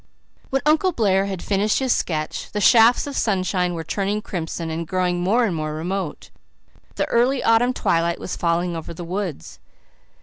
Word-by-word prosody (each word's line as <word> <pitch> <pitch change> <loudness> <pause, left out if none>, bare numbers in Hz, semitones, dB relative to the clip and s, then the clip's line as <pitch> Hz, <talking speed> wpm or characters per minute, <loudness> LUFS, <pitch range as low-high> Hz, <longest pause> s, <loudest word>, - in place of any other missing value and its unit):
When 270 0 -1
Uncle 315 +5 +3
Blair 195 -6 +2
had 190 -3 -5
finished 205 +1 +1
his 260 -2 +2
sketch 155 -3 -3
the 210 - -1
shafts 230 +3 +5
of 285 -1 -6
sunshine 185 -3 0
were 165 - -4
turning 200 +5 -2
crimson 165 -2 -4
and 165 +1 -4
growing 180 0 0
more 225 +7 +2
and 190 -6 -1
more 155 -1 -3
remote; 175 +1 -4 0.6
the - - 0
early 250 +3 +2
autumn 230 +2 +4
twilight 170 -8 0
was - - -5
falling 170 0 0
over 165 +1 -7
the 175 - -7
woods. 180 - -5
190 Hz, 170 wpm, -22 LUFS, 170-225 Hz, 0.6 s, shafts